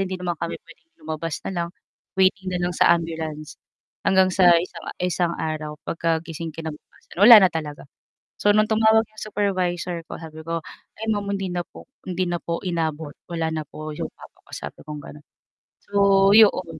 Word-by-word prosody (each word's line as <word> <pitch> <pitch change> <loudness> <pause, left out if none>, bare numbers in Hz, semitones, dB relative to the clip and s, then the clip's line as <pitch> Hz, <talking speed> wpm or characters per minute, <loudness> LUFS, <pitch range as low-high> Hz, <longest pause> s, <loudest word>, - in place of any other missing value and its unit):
hindi 190 -1 -2
naman 175 -1 -3
kami 170 - -3
puwedeng 325 - -20
lumabas 160 0 -4
na - - -2
lang, 170 -1 -2 0.5
waiting 190 0 +3
na 180 - -1
lang 175 - 0
sa - - +6
ambulance. 160 -2 -6 0.5
Hanggang 190 -1 +4
sa 180 -2 +6
isang 170 +2 -4
isang 175 -1 0
araw 155 -1 -3
pagkagising 165 -1 -2
kinabukasan, 160 0 -10
wala 230 +2 +12
na 185 - +4
talaga. 150 -3 -5 0.6
So, 205 - +4
nung 215 +1 +3
tumawag 220 0 +4
'yong 215 0 -14
supervisor 180 -5 -1
ko - - -8
sabi 160 -1 -10
ko, 165 0 -2 0.4
"Ay 220 - -5
ma'am, 205 -1 -2
hindi 195 -1 -3
na 175 - -1
po, - - -15 0.2
hindi 185 0 -1
na 175 0 -1
po 170 0 -2
inabot. 160 -4 -2 0.2
Wala 165 -1 -1
na 155 -1 -2
po 155 0 -7
yong - - -5
papa - - -16
ko," - - -21
sabi - - -8
kong 150 -1 -6
gano'n. 150 +1 -12 0.6
So, 200 -1 +4
'yon. 185 -7 +5
175 Hz, 180 wpm, -23 LUFS, 160-195 Hz, 0.6 s, wala